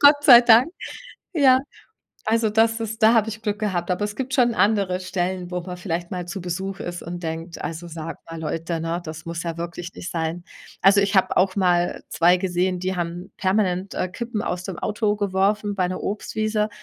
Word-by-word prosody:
Gott 290 0 +6
sei 245 -4 +10
Dank. 240 +2 +6 0.7
Ja, 265 -5 +5 0.7
also, 225 0 +2
das 225 +1 +2
ist 220 0 -4
da 220 +1 +7
habe 225 -2 +3
ich 220 0 -7
Glück 210 -1 -2
gehabt. 185 -5 -1
Aber 180 +3 0
es 210 0 -6
gibt 265 +1 -4
schon 240 -2 +3
andere 200 -4 +2
Stellen, 185 0 -3
wo 180 - -1
man 180 +1 -7
vielleicht 175 -1 -3
mal 180 -2 -4
zu 175 +3 -5
Besuch 190 +3 -4
ist 175 0 -5
und 175 +1 -6
denkt: 165 +1 -5
„Also, 165 +1 -5
sagt 165 0 -7
mal 165 - -6
Leute, 165 +1 -3
ne? 165 +2 -2
Das 155 -1 -8
muss 170 0 -4
ja 165 -1 -4
wirklich 170 +1 -6
nicht 185 - -7
sein.“ 165 0 -3 0.4
Also, 200 +2 +6
ich 200 0 0
habe 190 - +2
auch 185 +1 +3
mal 175 -2 +2
2 175 +2 +4
gesehen, 180 0 0
die 185 +1 -2
haben 175 +1 -4
permanent, 190 -1 0
äh, - - -1
Kippen 230 +3 -4
aus 180 -3 -3
dem 185 -1 -6
Auto 210 0 0
geworfen 205 +1 0
bei 185 -2 +1
'ner 185 - -4
Obstwiese. 215 +1 -1
185 Hz, 205 wpm, -23 LUFS, 175-215 Hz, 0.7 s, sei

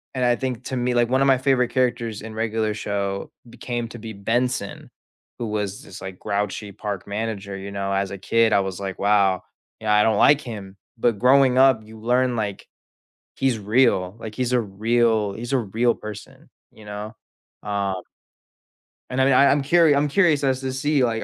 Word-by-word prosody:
And 130 -1 +1
I 120 0 +3
think 125 -1 -4
to 130 - -3
me 125 0 0
like, 120 -1 +2
one 130 +1 +2
of 135 - +4
my 135 -1 +5
favorite 130 -2 +2
characters 120 -4 -1
in 110 0 -8
Regular 110 -1 -1
Show 100 -2 -3 0.2
became 120 0 -4
to 120 - -10
be 110 0 -7
Benson, 115 +2 -2 0.5
who 120 - -4
was 105 -2 -3
this, - - -11
like, 95 -1 -8
grouchy 100 0 -3
park 100 -1 -5
manager, 100 -1 -4
you 100 +1 -7
know, 100 0 -2
as 100 0 -1
a 100 - -5
kid, 115 +4 +2
I - - +4
was 95 -1 -3
like, 95 -1 -5
"Wow, 100 -2 +2 0.4
you 110 - -11
know, - - +3
I 105 0 +5
don't 110 -2 +2
like 145 +6 +5
him." 100 -5 -8 0.2
But 115 -1 +1
growing 130 0 +5
up, 130 -4 +5
you 110 +1 -13
learn, 125 +2 +1
like, 105 -3 -4 0.7
he's 130 -3 +1
real, 105 -4 +2
like, 110 -1 -8
he's 125 -1 -1
a 125 - +3
real 110 0 +1
he's 120 +5 -5
a - - +4
real 115 +3 +1
person, 105 -2 -10 0.2
you 110 - -16
know? 105 +2 -7 0.5
Um 100 -3 -2 1.1
And, 125 - -2
I - - +4
mean, 135 - +4
I 140 +2 +6
I'm 140 0 +3
curi 160 0 +4
I'm 145 +1 +2
curious 150 -2 +3
as 130 -2 +1
to 130 -1 -3
see, 140 +1 +1
like, 115 -2 0
115 Hz, 200 wpm, -23 LUFS, 100-125 Hz, 1.1 s, I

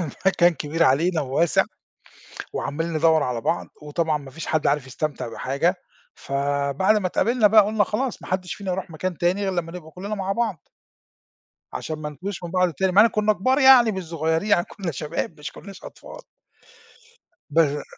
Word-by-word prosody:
المكان 175 +1 +2
كبير 155 +4 -2
علينا 160 +5 +2
وواسع 145 +5 +2 0.9
وعمّالين 165 +4 -3
ندَوّر 160 -1 +3
على 125 -4 -2
بعض، 170 - -1 0.2
وطبعًا 150 +1 -1
ما 140 -2 -11
فيش 165 +3 -8
حد 155 -1 0
عارف 140 -2 +1
يستمتع 145 -2 -4
بحاجة، 140 +10 0 0.4
فبعد 140 +8 0
ما 195 -3 0
اتقابلنا 225 +4 +2
بقى، 215 0 +6
قُلنا 210 0 +1
"خلاص 245 +5 -3
ما - - -10
حدّش 185 -1 -2
فينا 195 -3 -4
يروح 185 -1 -4
مكان 175 +2 -4
تاني، 180 +4 +1
غير 190 -1 -1
لمّا 170 -2 -3
نبقى 165 -3 -9
كُلّنا 200 +5 -5
مع 195 -1 -2
بعض." 215 -6 -3 1.0
عشان 155 -1 -5
ما 150 -1 -5
نتوهش 180 +5 -7
من 170 - -5
بعض 180 -1 +1
تاني، 185 +5 0
مع 205 +3 +7
إن - - +6
كُنّا 215 0 +1
كُبار 255 +8 +1
يعني، 260 -5 +7
مش 190 -1 -4
صغيرين 160 +4 -1
يعني 175 - +4
كُنّا 190 -5 -5
شباب 155 +2 -4
مش 145 - -7
كُنّاش 195 -2 -12
أطفال. - - -11 1.3
بّر 150 -2 +2
170 Hz, 175 wpm, -23 LUFS, 150-195 Hz, 1.3 s, مع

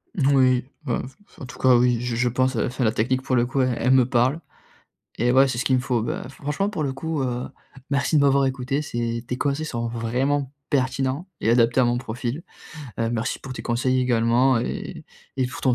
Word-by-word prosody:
Moui, 130 -4 +3 0.2
bah, 125 -5 -1
f 135 - -15
f - - -21
en 135 - -5
tout 125 - -11
cas 130 -1 +5
oui, 120 -1 +3
je 125 -1 -3
je 125 +1 +1
pense, 130 +2 +1
enfin 125 +3 -1
la 110 - +3
technique 130 +4 0
pour 130 -1 0
le 120 0 +2
coup, 135 +1 0
e 130 -1 +1
elle 125 - +1
me 130 -2 +5
parle, 130 +4 +2 0.8
et 120 +1 +2
ouais, 135 +1 +6
c'est 120 - -3
ce 125 - -2
qu'il 130 - +3
me 125 - +1
faut. 125 -2 0
Bah 120 - -4
franchement 150 +9 -2
pour 155 -8 -3
le 135 - -1
coup, 155 +2 -3
heu, 125 -1 -2 0.4
merci 140 +3 +1
de 145 - +5
m'avoir 140 -1 +4
écouté. 135 +2 -1
c'est 115 -3 -3
tes 125 - -3
conseils 145 +3 -1
sont 120 -5 -3
vraiment 130 +4 -1 0.2
pertinents 135 +4 0
et 110 - +1
adaptés 120 +1 +4
à - - +4
mon 120 0 +1
profil! 125 +4 -4 0.6
Heu, 115 0 0
merci 120 +2 -2
pour 130 -1 -8
tes - - -6
conseils 130 +2 +1
également 120 +1 +3
et 120 - -5 0.3
et 130 - +2
pour 125 - -8
ton 130 -2 +3
130 Hz, 225 wpm, -23 LUFS, 120-135 Hz, 0.8 s, ouais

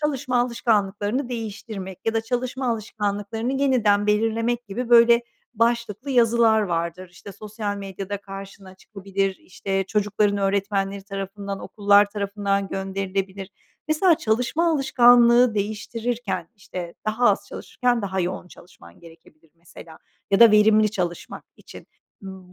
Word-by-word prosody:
çalışma 270 -4 -1
alışkanlıklarını 225 0 0
değiştirmek 215 -5 -6
ya 225 - 0
da 225 - +2
çalışma 250 +3 -3
alışkanlıklarını 215 +1 -3
yeniden 240 -7 +2
belirlemek 225 +3 0
gibi 230 +5 -5
böyle 235 0 +6 0.3
başlıklı 235 +2 -1
yazılar 230 -3 +4
vardır. 170 0 -3
İşte, 195 +2 -12
sosyal 210 0 -5
medyada 195 0 -6
karşına 195 -1 -10
çıkabilir, 195 -1 -4
işte, 195 +1 -4
çocukların 205 0 0
öğretmenleri 195 0 -1
tarafından, 195 0 -6
okullar 205 0 +3
tarafından 200 -1 -2
gönderilebilir. 195 0 -4 0.4
Mesela 330 +3 +4
çalışma 250 +10 0
alışkanlığı 245 -4 +5
değiştirirken, 215 -2 -3
işte, 180 -3 -8
daha 220 +3 +3
az - - -2
çalışırken 245 -2 -2
daha 190 -1 -2
yoğun 180 0 -4
çalışman 85 - -17
gerekebilir 165 -1 -19
mesela 165 -1 -14 0.3
ya 200 +2 +2
da 230 -1 +9
verimli 215 0 +4
çalışmak 175 -4 -5
için. - - -14 0.4
Imm, 190 -2 -11
205 Hz, 120 wpm, -23 LUFS, 195-235 Hz, 0.4 s, da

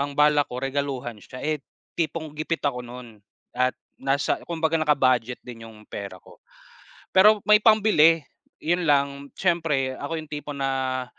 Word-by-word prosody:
bal 150 +1 +6
balak 145 -1 +2
ko 125 - -4
regaluhan 135 -4 -3
siya, 125 - -10
eh, 155 -1 -1 0.4
tipong 160 -2 -2
gipit 155 +2 -2
ako 125 -3 0
nun 120 -3 -11 0.4
at 125 0 +1 0.3
nasa 135 +1 0
kumbaga 165 -1 0
naka-budget 130 -5 +2
din 115 -2 -10
yung 110 -1 -14
pera 100 -2 -7
ko. - - -18 0.8
Pero 210 +3 +7
may 210 0 +8
pambili, 210 -8 +5 0.4
yun 175 +3 +1
lang 140 -1 +1
siyempre 160 -8 0
ako 160 +3 -4
yung 155 -1 -13
tipo 150 0 -6
na 135 -2 -1
140 Hz, 150 wpm, -24 LUFS, 130-160 Hz, 0.8 s, may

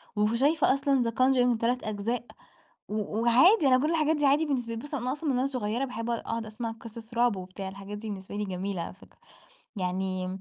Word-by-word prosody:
وف 210 +1 +2
شايفة 280 +4 +3
أصلًا 275 -2 +2
3 250 +1 +3
the - - -2
conjuring 235 -1 0
أجزاء 220 +4 -2 0.6
و 210 0 -3
وعادي 270 - +5
أنا 255 - +6
كل 300 +4 +1
الحاجات 315 -1 +2
دي 295 -1 +1
عادي 285 +3 +4
بالنسبة 245 -6 -2
بُص، 285 +7 -8
أنا 255 -2 -1
أصلًا 300 +2 -3
من 260 - +2
وأنا 255 +2 +1
صغيرة 245 -1 -1
باحب 230 -2 -5
أقعد 235 -1 0
أقعد 230 0 -4
أسمع 225 +2 -4
قصص 225 0 -10
رعب 240 -2 +3
وبتاع، 185 +1 -7
الحاجات 200 +2 -8
دي 220 +1 -6
بالنسبة 195 0 -7
لي 210 - -1
جميلة 190 -1 -3
على - - -6
فكرة. 190 - -20 0.6
يعني 185 -1 -2
230 Hz, 210 wpm, -28 LUFS, 210-265 Hz, 0.6 s, أنا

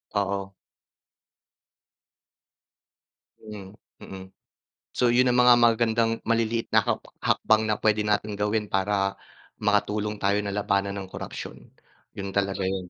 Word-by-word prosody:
Oo. 100 -1 -2 2.9
Mhm, 105 -2 -11 0.2
mm. 95 -1 -9 0.7
So 125 - +1
'yun 125 +1 +3
ang 125 - +1
mga 125 0 +7
magagandang 115 -1 +2
maliliit 115 0 0
na - - +6
hak - - -1 0.2
hakbang 110 0 +2
na 110 -1 -1
puwede 105 -1 +2
nating 105 0 -1
gawin 105 +1 -1
para 100 0 0 0.5
makatulong 105 0 0
tayo 100 +1 +1
na 100 - -4
labanan 100 -1 -1
ang 95 - -7
korapsyon, - - -8 0.4
'yun 100 -1 -6
talaga 100 -1 -1
'yun. 95 -1 -3
105 Hz, 120 wpm, -25 LUFS, 100-110 Hz, 2.9 s, mga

